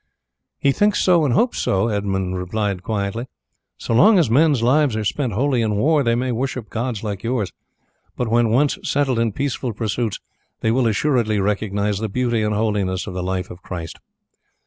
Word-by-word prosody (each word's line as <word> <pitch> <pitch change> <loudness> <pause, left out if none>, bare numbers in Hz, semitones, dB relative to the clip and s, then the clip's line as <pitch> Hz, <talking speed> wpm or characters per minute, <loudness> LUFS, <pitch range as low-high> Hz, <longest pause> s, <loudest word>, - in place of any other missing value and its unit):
"He 140 - +2
thinks 205 +7 +2
so 175 -4 +4
and 125 -4 +1
hopes 245 0 +1
so," 95 +4 +1
Edmund 95 -3 -1
replied 95 +1 -2
quietly. 105 +4 -3 0.5
"So - - -3
long 205 - +6
as 160 -10 +2
men's 140 -2 +3
lives 135 0 +3
are 110 -1 -2
spent 125 +1 -1
wholly 130 +3 +1
in 110 -2 0
war 145 +8 +3
they 115 -3 +2
may 125 +1 -1
worship 125 -2 -3
gods 115 -2 -3
like 100 -3 -4
yours, 115 -4 -2 0.7
but 125 - -1
when 115 0 +2
once 135 +6 +2
settled 135 -4 0
in 115 -1 +1
peaceful 130 0 -3
pursuits 110 0 -2 0.4
they 110 - +1
will 125 0 +2
assuredly 110 -2 +1
recognize 100 0 -1
the 110 0 -3
beauty 120 +1 0
and 105 0 0
holiness 100 -4 -1
of 95 - -6
the 90 - -3
life 95 0 -3
of 90 - -11
Christ. 85 -3 -7
115 Hz, 185 wpm, -21 LUFS, 100-130 Hz, 0.7 s, long